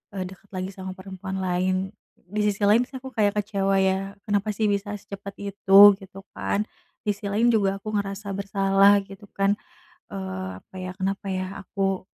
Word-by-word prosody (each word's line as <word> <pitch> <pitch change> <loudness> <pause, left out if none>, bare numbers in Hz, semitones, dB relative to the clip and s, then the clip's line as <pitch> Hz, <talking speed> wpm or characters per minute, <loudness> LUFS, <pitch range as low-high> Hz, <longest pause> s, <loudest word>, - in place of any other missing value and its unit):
eee, 185 - -2
dekat 190 +1 -15
lagi 185 +1 -3
sama 190 -1 -6
perempuan 190 0 -6
lain. 185 +1 0 0.4
Di 210 +1 -1
sisi 205 0 -1
lain 225 +4 +5
sih 270 - -29
aku 265 +1 -8
kayak 210 -2 +2
kecewa 195 -2 +1
ya 190 +1 0
kenapa 205 +1 +1
sih 215 +1 +1
bisa 205 +1 -1
secepat 200 0 -8
itu 195 -1 +4 0.2
gitu 195 0 -11
kan. 205 - 0 0.4
Di 210 - +3
sisi 205 0 -10
lain 230 +4 +3
juga 195 -2 +2
aku 215 0 -5
ngerasa 200 0 -3
bersalah 195 0 +4
gitu 195 +1 -12
kan, 195 +1 +2 0.6
eee, 95 -1 -4
apa 190 - -16
ya 185 0 -4
kenapa 195 0 -2
ya 185 0 -2 0.2
aku, 195 -1 -1
195 Hz, 175 wpm, -25 LUFS, 190-205 Hz, 0.6 s, lain